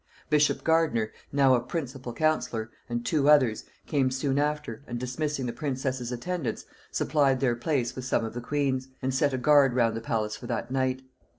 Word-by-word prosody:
Bishop 150 -1 +3
Gardiner, 160 -10 +2 0.2
now 135 -2 +4
a 125 - +4
principal 130 -2 -5
counsellor, 120 -6 0 0.2
and 120 0 -3
two 150 -2 +2
others, 130 -8 +4 0.2
came 135 -3 +1
soon 135 +1 0
after, 150 -6 -2
and, 120 - -4
dismissing 135 +2 -2
the 120 - -3
princess's 130 -4 -3
attendants, 155 +4 -3 0.2
supplied 140 -4 +2
their 125 -3 +2
place 120 -1 -1
with 130 - -5
some 125 - +1
of 110 - -6
the 120 - -5
queen's, 135 0 -1 0.2
and 130 0 0
set 140 +2 +2
a 130 - -1
guard 135 -1 +5
round 115 -3 +2
the 115 - -4
palace 110 -2 -1
for - - -9
that 120 +1 -3
night. 130 0 0
130 Hz, 185 wpm, -27 LUFS, 120-145 Hz, 0.2 s, guard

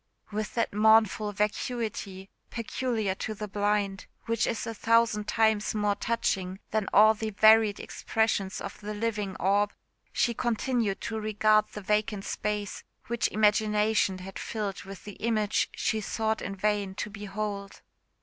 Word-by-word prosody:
With 215 +1 -3
that 230 - 0
mournful 215 0 +4
vacuity, 210 -2 -3 0.2
peculiar 230 -3 -2
to 215 +3 -5
the 210 +1 -5
blind, 205 -1 -1 0.2
which 230 0 +1
is 230 - -2
a 230 - -4
thousand 225 -1 +2
times 220 -1 +2
more 210 -1 +2
touching 190 -4 -1
than 215 -2 0
all 215 +2 +7
the 220 0 -4
varied 215 0 +5
expression 220 -3 -1
of 200 - -7
the 210 +1 -5
living 210 -3 -2
orb, 200 +2 +1 0.4
she 240 -3 +1
continued 235 -3 -1
to 220 -1 -3
regard 215 0 +3
the 210 - -6
vacant 210 0 0
space 210 -1 -3 0.2
which 235 0 0
imagination 210 -1 +2
had 190 +1 -8
filled 205 -4 -4
with 195 -1 -10
the 205 -2 -9
image 215 -2 +1
she 220 - 0
sought 220 +1 -1
in 195 - -4
vain 205 -1 0
to 210 - -4
behold. 205 -1 -5
210 Hz, 145 wpm, -28 LUFS, 200-220 Hz, 0.4 s, all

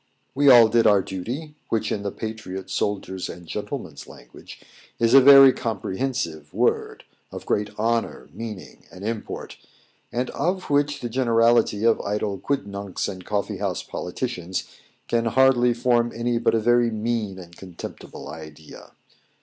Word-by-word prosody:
We 140 +1 +4
all 120 -3 +9
did 115 0 +3
our 100 -3 +4
duty, 125 - -6 0.2
which, 110 -1 -1
in 105 - -2
the 100 -1 -3
patriot's, 100 -4 -6
soldier's, 95 -2 -2
and 85 - -9
gentleman's - - -6
language, - - -14 0.4
is 115 +1 +2
a 135 - +9
very 135 0 +9
comprehensive 100 - -3
word, - - 0 0.3
of - - -8
great 105 0 -2
honour, 115 +1 -1
meaning, 110 -5 -9
and 95 +2 -9
import, 110 -1 -5 0.5
and 125 +2 -2
of 185 -1 -2
which 145 0 +1
the 120 - -3
generality 115 -3 +2
of 115 0 +3
idle 100 -1 -2
quidnuncs 100 -8 -3
and 95 -2 -7
coffee 100 -2 -2
house - - -3
politicians 90 -2 -4 0.4
can 115 0 0
hardly 125 +1 +4
form 120 0 +1
any 120 0 -1
but - - +2
a - - +2
very 120 +1 +3
mean 110 -3 -2
and 85 -2 -12
contemptible 90 -5 -10
idea. 75 0 -11
115 Hz, 145 wpm, -23 LUFS, 95-120 Hz, 0.5 s, all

